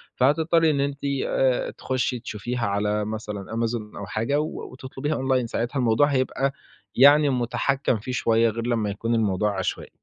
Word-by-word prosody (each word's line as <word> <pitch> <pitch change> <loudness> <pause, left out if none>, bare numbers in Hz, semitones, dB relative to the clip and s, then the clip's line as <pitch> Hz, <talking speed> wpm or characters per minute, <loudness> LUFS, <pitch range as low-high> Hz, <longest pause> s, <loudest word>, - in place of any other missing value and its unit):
فهتضطرّي 160 +4 +3
إن 140 - -1
أنتِ 140 0 -2 0.3
آآ، 130 -2 +1
تخشّي 130 -1 -2
تشوفيها 115 +1 -3
على 105 +1 0
مثلًا 105 -2 -5
Amazon 115 -2 -3
أو 100 - -5
حاجة 115 +8 -1
و 155 - -5
وتطلبيها 130 +3 -4
أونلاين، 130 -2 0
ساعتها 120 +4 -2
الموضوع 120 +4 +3
هيبقى 135 0 0 0.4
يعني 145 +3 +7
مُتحكّم 130 +1 0
فيه 125 +4 -6
شوية، 115 -2 +2
غير 115 +2 -4
لمّا 110 -4 0
يكون 115 +4 -1
الموضوع 105 -2 0
عشوائي. 95 - -3
120 Hz, 155 wpm, -24 LUFS, 110-135 Hz, 0.4 s, يعني